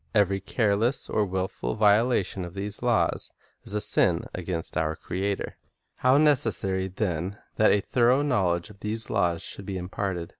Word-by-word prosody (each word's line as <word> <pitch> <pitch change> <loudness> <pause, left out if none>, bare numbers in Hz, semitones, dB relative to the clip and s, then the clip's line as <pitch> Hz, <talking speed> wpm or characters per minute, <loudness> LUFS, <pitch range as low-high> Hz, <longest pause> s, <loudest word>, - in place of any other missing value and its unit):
Every 100 -1 +3
careless 110 +4 0
or 105 -2 +1
wilful 95 -9 -3
viola 110 +2 +4
tion 95 +1 -5
of 85 +1 -8
these 100 +1 -5
laws 120 -2 +1 0.3
is 105 - -4
a 105 - 0
sin - - +2
against 90 -2 -4
our 80 0 0
Creator. 95 +4 -3 0.4
How 130 +2 +4
necessary, 115 -10 +2
then, 95 -1 -3 0.2
that 110 - +5
a 105 - +3
thorough 125 +6 +3
knowledge 90 - 0
of 100 - -17
these 110 +2 -4
laws 85 -5 +1
should 100 - -6
be 95 -2 -3
imparted! 90 -1 -4
100 Hz, 160 wpm, -26 LUFS, 90-110 Hz, 0.4 s, that